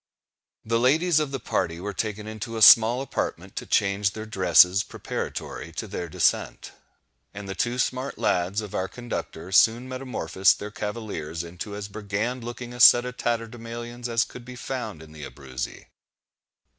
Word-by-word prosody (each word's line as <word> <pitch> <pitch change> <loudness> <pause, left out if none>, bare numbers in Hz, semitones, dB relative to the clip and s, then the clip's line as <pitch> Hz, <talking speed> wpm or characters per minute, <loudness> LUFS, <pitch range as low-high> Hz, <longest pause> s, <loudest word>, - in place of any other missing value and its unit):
The 115 +1 +1
ladies 155 +6 +3
of 150 -2 -1
the 135 -1 -4
party 85 -7 -2
were 100 +3 -5
taken 105 +1 -3
into 110 +1 -6
a 110 - +3
small 115 +5 +8
apartment 135 - -4
to - - -4
change 100 0 +1
their 110 0 -6
dresses 95 -2 +5
preparatory - - -6
to - - -4
their 85 - -5
descent; - - 0 0.6
and 100 -1 -7
the 95 - -4
two 120 +5 -1
smart 130 +2 -1
lads 90 +4 0
of 105 -3 -8
our 95 - -1
conductor 95 -7 -6
soon 115 +5 +4
metamorphosed 125 -8 +1
their 105 +1 -7
cavaliers 105 -7 -5
into 90 +5 -7
as 100 -1 -5
brigand 110 +4 -3
looking 120 +1 -7
a 120 - -9
set 120 0 +8
of 125 0 -6
tatterdemallions 120 +1 -4
as 115 0 +2
could 125 - -11
be 125 +1 -10
found 120 - -5
in 80 - -15
the 75 -1 -10
Abruzzi. 65 -4 -7
110 Hz, 165 wpm, -25 LUFS, 95-120 Hz, 0.6 s, small